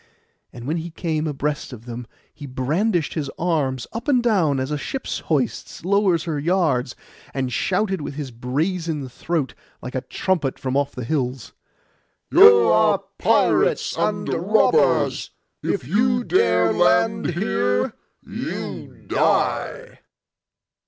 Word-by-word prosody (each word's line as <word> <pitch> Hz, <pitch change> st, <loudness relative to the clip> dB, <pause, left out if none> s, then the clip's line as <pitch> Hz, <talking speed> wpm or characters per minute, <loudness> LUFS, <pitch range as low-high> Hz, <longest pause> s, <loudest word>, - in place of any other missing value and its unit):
And 120 Hz, -1 st, -10 dB
when 155 Hz, +5 st, -1 dB
he 165 Hz, +1 st, -5 dB
came 160 Hz, -2 st, -2 dB
abreast 145 Hz, 0 st, -3 dB
of 120 Hz, -2 st, -10 dB
them 120 Hz, 0 st, -7 dB, 0.3 s
he 145 Hz, -, -9 dB
brandished 155 Hz, -, 0 dB
his 150 Hz, -4 st, -3 dB
arms 145 Hz, -7 st, 0 dB
up 230 Hz, +4 st, -6 dB
and 255 Hz, -4 st, +3 dB
down, 175 Hz, -, +2 dB
as 130 Hz, +2 st, -3 dB
a 150 Hz, -, 0 dB
ship 265 Hz, -, -5 dB
hoists 140 Hz, -6 st, -2 dB
and 185 Hz, -, -4 dB
lowers 195 Hz, -5 st, +3 dB
her 155 Hz, -4 st, -2 dB
yards, 150 Hz, -7 st, +1 dB, 0.4 s
and 130 Hz, -2 st, -2 dB
shouted 190 Hz, -, 0 dB
with 145 Hz, -, -6 dB
his 140 Hz, -3 st, -5 dB
brazen 150 Hz, +5 st, -2 dB
throat 145 Hz, +2 st, -3 dB, 0.3 s
like 125 Hz, -, -8 dB
a 130 Hz, -, -2 dB
trumpet 165 Hz, -6 st, -1 dB
from 130 Hz, -1 st, -3 dB
off 140 Hz, 0 st, 0 dB
the 125 Hz, -, -6 dB
hills, 125 Hz, -2 st, -2 dB, 0.8 s
'You 95 Hz, -1 st, +8 dB
are -, -, +3 dB, 0.2 s
pirates, -, -, +2 dB
you -, -, -3 dB
are -, -, +3 dB, 0.3 s
robbers! -, -, +2 dB, 0.3 s
If -, -, -2 dB
you 240 Hz, -, +2 dB
dare 380 Hz, -, +3 dB
land 215 Hz, -6 st, +2 dB
here, 100 Hz, -, 0 dB, 0.3 s
you -, -, -6 dB
die. -, -, 0 dB
150 Hz, 140 wpm, -22 LUFS, 130-180 Hz, 0.8 s, You